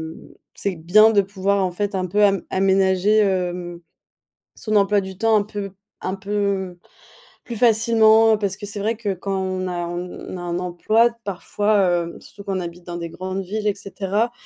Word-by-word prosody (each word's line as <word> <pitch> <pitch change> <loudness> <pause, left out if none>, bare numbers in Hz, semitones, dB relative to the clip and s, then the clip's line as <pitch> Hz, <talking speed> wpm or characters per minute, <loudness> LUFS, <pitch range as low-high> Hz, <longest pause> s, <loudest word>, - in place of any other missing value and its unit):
mmh, - - -15 0.2
c'est 195 -2 -2
bien 200 +7 +5
de 205 -2 +4
pouvoir 195 0 0
en 185 - -1
fait 205 +3 -3
un 185 -1 -1
peu 200 +4 0
am 195 -1 +2
aménager, 190 +2 +3
hem, 180 -3 -1 0.7
son 215 -1 -3
emploi 200 0 +3
du 190 -1 -8
temps 225 +2 +3
un 205 - +1
peu 205 -1 -6 0.3
un 185 - -2
peu 195 -2 -2 0.7
plus 235 -2 -6
facilement. 225 -1 +5
Parce 200 -2 -2
que 205 - -7
c'est 205 +1 -6
vrai 220 +3 0
que 210 -3 -2
quand 195 +1 -3
on 185 -1 -2
a 175 -1 -3
on 175 +1 -6
a - - -7
un 175 0 -3
emploi 185 +6 +2 0.2
parfois, 195 -2 +1
hem, 170 - -9
surtout 200 - -13
quand 195 -2 -2
on - - -2
habite 175 0 -8
dans 175 -1 -6
des 170 -1 -5
grandes 185 +3 -5
villes, 210 +3 -3
et 205 - +1
cetera, 200 +3 -2
195 Hz, 190 wpm, -21 LUFS, 185-210 Hz, 0.7 s, bien